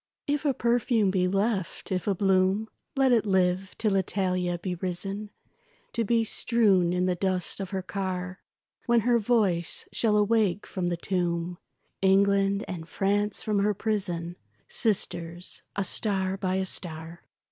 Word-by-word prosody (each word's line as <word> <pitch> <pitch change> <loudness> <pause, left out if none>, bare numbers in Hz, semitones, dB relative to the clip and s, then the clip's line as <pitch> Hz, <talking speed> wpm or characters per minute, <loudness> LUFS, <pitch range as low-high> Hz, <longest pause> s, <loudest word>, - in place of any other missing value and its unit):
If 290 +1 -1
a 280 - +3
perfume 235 -4 +2
be 185 -1 +1
left, 195 -1 -1
if 185 0 -2
a 200 - +2
bloom, 190 +3 +2 0.3
Let 270 -1 +3
it 230 -4 +4
live 190 -1 +1
till 215 -3 +1
Italia 185 -2 0
be 180 +1 -4
risen, 195 +4 -4 0.6
To 230 - 0
be 230 +1 +2
strewn 205 -6 +2
in 180 0 +1
the 185 - +2
dust 185 +1 -1
of 195 -2 -4
her 190 -1 -3
car 185 -1 -4 0.5
When 235 -1 +4
her 240 +1 +3
voice 205 -7 +1
shall 215 -2 +2
awake 210 -2 +2
from 180 -2 -3
the 175 -1 -1
tomb 175 -1 -2 0.4
England, 195 +1 +3
and 165 -3 -7
France 205 +3 0
from 210 -2 0
her 205 +1 +1
prison, 180 -5 -2 0.3
Sisters, 175 -5 +1
a 200 - 0
star 190 -1 0
by 190 -1 -1
a 190 0 0
star. 165 -2 -4
195 Hz, 150 wpm, -27 LUFS, 180-210 Hz, 0.6 s, it